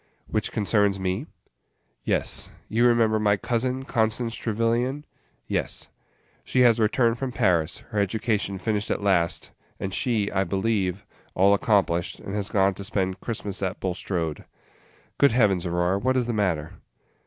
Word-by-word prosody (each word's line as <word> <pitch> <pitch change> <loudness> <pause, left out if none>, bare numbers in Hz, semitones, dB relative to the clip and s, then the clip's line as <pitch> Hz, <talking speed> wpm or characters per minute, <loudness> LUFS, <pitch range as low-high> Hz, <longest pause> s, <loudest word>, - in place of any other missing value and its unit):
"Which - - -2
concerns 105 -2 +1
me?" 95 - -2 0.8
"Yes. - - +1 0.2
You 120 +3 +3
remember 115 -2 +3
my 105 -1 +3
cousin, 130 +4 -1
Constance 115 0 0
Trevyllian?" 120 +5 -1 0.4
"Yes - - -2 0.3
" - - -37
"She 130 - +1
has 120 -2 +5
returned 115 +2 +2
from 135 -2 -2
Paris, 85 -6 +1
her 105 - 0
education 105 -1 0
finished 105 +1 -2
at - - -1
last, 90 -4 +1 0.3
and 95 -1 -4
she, 110 -5 0
I 95 0 +1
believe, 95 0 -1 0.3
all 100 +2 +5
accomplished, 90 -5 +1
and 95 - -7
has 100 -1 -2
gone 95 -1 +3
to 100 - -7
spend 95 -2 -1
Christmas 105 -4 -4
at 95 0 -2
Bulstrode. 90 -3 -2 0.7
Good 140 -5 +5
Heavens, 100 -7 +2
Aurora, 90 +3 +1
what 130 +4 +1
is 125 - +2
the 120 - -2
matter?" 90 -8 -1
105 Hz, 150 wpm, -25 LUFS, 95-115 Hz, 0.8 s, has